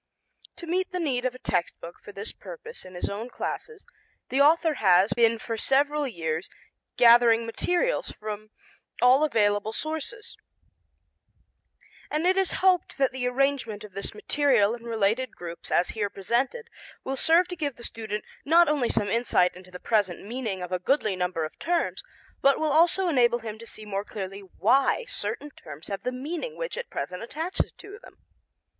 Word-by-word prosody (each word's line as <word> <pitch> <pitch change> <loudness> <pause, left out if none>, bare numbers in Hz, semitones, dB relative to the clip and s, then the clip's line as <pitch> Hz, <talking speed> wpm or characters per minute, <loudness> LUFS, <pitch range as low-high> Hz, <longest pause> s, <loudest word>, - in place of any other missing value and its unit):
To 345 - -9
meet 365 +3 -1
the 365 - -2
need 260 -7 -1
of 255 0 -1
a - - -8
text 175 -8 -2
book 170 +1 -9
for - - -10
this 200 +2 -5
purpose 470 -1 -10
in 185 0 -11
his 175 - -2
own 215 +5 -5
classes 445 - -5 0.4
the 270 +2 +2
author 320 +2 +5
has 190 0 +5
been 230 -1 +3
for 225 0 -4
several 290 +4 +2
years 165 -6 -3 0.5
gathering 235 -1 +6
material 355 - 0
from 215 0 -7 0.5
all 255 +4 +6
available 210 -6 +2
sources, 320 - -5 1.7
and 305 +3 -1
it 370 +1 +4
is 385 -1 +2
hoped 370 -2 +3
that 270 -3 +2
the 255 -1 -2
arrangement 250 -5 0
of 210 - -10
this 200 +2 -5
material 235 -2 +2
in 235 0 -8
related 225 +2 0
groups 170 -1 -8
as 175 - +2
here 210 -2 -2
presented 250 - -1 0.4
will 270 - -2
serve 330 +6 +4
to 360 - -4
give 290 -6 -3
the 235 - -13
student 215 -2 -4 0.2
not 335 +4 +5
only 285 -5 +1
some 205 -2 +1
insight 230 -6 +2
into 185 0 -13
the 180 0 -9
present 195 -5 0
meaning 215 -5 -4
of 180 - -7
a 185 - 0
goodly 215 -1 +1
number 180 -3 -1
of 155 - -10
terms, 345 0 0 0.4
but 275 0 +4
will 310 -1 +1
also 345 +5 +4
enable 245 -7 +3
him 220 -2 -7
to 230 - -10
see 215 - -6
more 200 -1 -3
clearly 195 -2 -6
why 265 - +2
certain 280 - -4
terms 155 - -11
have 195 -1 -4
the 250 - -2
meaning 325 - -5
which - - -4
at - - -6
present 180 0 -4
attaches 320 +10 -3
to 405 +1 -11
them. - - -16
240 Hz, 175 wpm, -26 LUFS, 205-305 Hz, 1.7 s, gathering